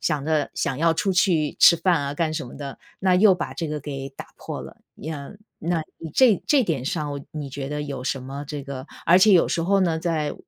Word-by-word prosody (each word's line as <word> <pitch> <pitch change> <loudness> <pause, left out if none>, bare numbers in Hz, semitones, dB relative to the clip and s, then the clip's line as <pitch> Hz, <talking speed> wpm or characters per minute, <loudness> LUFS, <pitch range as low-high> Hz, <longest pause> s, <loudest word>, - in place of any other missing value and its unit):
想 150 -3 -1
着 155 -2 +1
想 135 - -1
要 165 +1 +3
出 195 +3 0
去 170 -5 +2
吃 170 - +8
饭 170 -1 +2
啊 140 0 -3
干 160 0 0
什 130 - -4
么 - - -11
的， 140 -1 -7 0.2
那 185 -1 +3
又 195 0 +6
把 - - -5
这 165 - -3
个 150 0 -3
给 135 -1 -6
打 135 - -10
破 - - -6
了。 - - -11 0.2
呀， 150 -1 -7 0.3
那 170 0 -1 0.3
这 240 -8 +5
这 280 -3 +4
点 150 - -2
上 150 -1 -2
我 140 - -5
你 150 -3 -5
觉 135 0 -5
得 150 0 -3
有 140 -3 -5
什 135 -1 -2
么 140 +2 -6
这 145 -1 -5
个 135 0 -7 0.2
而 175 +2 +7
且 205 +2 +6
有 180 - +5
时 165 - 0
候 195 +3 +2
呢， 165 -3 +1
在 160 -3 -1
155 Hz, 250 characters per minute, -24 LUFS, 140-175 Hz, 0.3 s, 吃